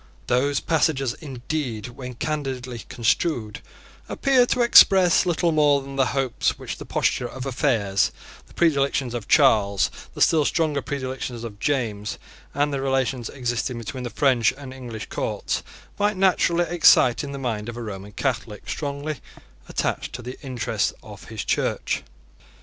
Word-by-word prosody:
Those 135 +3 +1
passages 140 -5 +1
indeed, 130 -4 -4
when 125 0 -8
candidly 130 -4 -3
construed, 115 -2 0 0.5
appear 260 -3 +3
to 245 - +2
express 190 -6 +6
little 170 0 +2
more 150 -2 +4
than 135 0 -8
the 135 -1 +2
hopes 130 -3 0
which - - -6
the - - -9
posture 125 - 0
of 130 +2 -7
affairs, 115 -7 +1 0.4
the - - -20
predilections 140 -6 +1
of 115 -4 -5
Charles, 105 -9 +4 0.2
the - - -6
still 155 -2 +5
stronger 150 -2 0
predilections 130 -3 -4
of 105 -3 -8
James, 110 -8 -1 0.4
and 145 0 +1
the 135 - -1
relations 135 -3 0
existing 125 -1 -2
between 115 +3 -6
the 120 - -3
French 125 -3 +3
and 135 -2 -9
English 120 -4 -7
courts, - - -2 0.4
might 205 -1 +1
naturally 175 -2 +3
excite 155 -6 +5
in 140 - -5
the 140 - -5
mind 115 -4 -3
of 120 - -7
a 120 - -5
Roman 100 -2 -7
Catholic 115 -3 -3
strongly 145 0 -4 0.5
attached - - -2
to 125 +2 -6
the 125 +2 -6
interests 130 -6 -1
of - - -11
his - - -6
Church. - - 0
130 Hz, 150 wpm, -24 LUFS, 120-145 Hz, 0.5 s, express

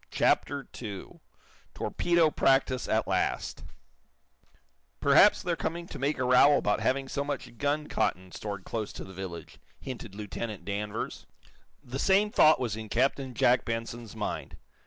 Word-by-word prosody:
CHAPTER 140 -2 +1
II 100 -5 -7 0.6
TORPEDO 170 -3 +2
PRACTICE 135 -3 +2
AT - - +1
LAST - - -1 1.4
"Perhaps - - +5
they're 175 -1 0
coming 170 +1 -3
to 145 - -7
make 140 +3 0
a 130 - -1
row 125 +3 +6
about 105 - +1
having 135 +1 0
so 140 +1 -2
much 140 -4 -5
gun 145 +1 0
cotton 90 0 -1
stored 100 -1 -6
close 110 0 -4
to - - -7
the 95 - -11
village," 90 -4 -8 0.2
hinted 115 -6 -8
Lieutenant 105 0 -6
Danvers. 105 +1 -4 0.6
The 125 +2 -6
same 200 +5 +3
thought 155 -9 +6
was 115 -5 -2
in 110 -1 -7
Captain 130 +2 0
Jack 125 +3 +4
Benson's 115 -1 -5
mind. - - -4
125 Hz, 145 wpm, -29 LUFS, 105-145 Hz, 1.4 s, row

